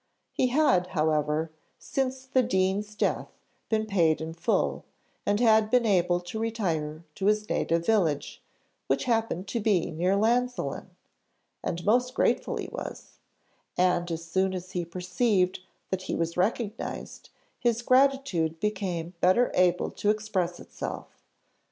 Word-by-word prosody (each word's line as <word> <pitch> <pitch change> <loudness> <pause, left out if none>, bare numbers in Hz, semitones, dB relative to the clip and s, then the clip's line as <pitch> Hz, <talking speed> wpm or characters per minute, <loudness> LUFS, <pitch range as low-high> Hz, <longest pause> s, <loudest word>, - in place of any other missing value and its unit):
He 255 - +1
had, 250 -10 +3
however, 155 +1 +1 0.3
since 265 -1 -3
the 260 0 +2
dean's 205 -1 0
death, - - 0 0.4
been 220 -1 +1
paid 170 -7 +2
in 160 +1 -5
full, 165 - 0 0.4
and 205 +1 +2
had 220 -2 +4
been 245 0 +3
able 180 -4 +3
to 175 +5 -6
retire 170 -9 -2
to 195 - -2
his 210 0 +2
native 165 0 0
village, 165 -10 +1 0.5
which - - +1
happened 225 -6 0
to 235 - -1
be 205 -6 +1
near 180 +5 +1
Llansillen, 245 +4 0 0.8
and 170 +1 -3
most 250 +4 +2
grateful - - +1
he - - -4
was; - - -8 0.6
and 180 -1 +2
as 165 0 -4
soon 190 +3 0
as 185 0 -7
he 175 -1 -2
perceived 185 +2 0 0.3
that 190 -1 -1
he - - -3
was 165 0 -2
recognised, 210 +3 -3 0.3
his 240 -1 +1
gratitude 255 - +2
became 185 -4 -2
better 185 +8 +4
able 180 -1 +2
to 205 - -1
express 205 -5 -1
itself. - - -6
190 Hz, 140 wpm, -27 LUFS, 175-225 Hz, 0.8 s, had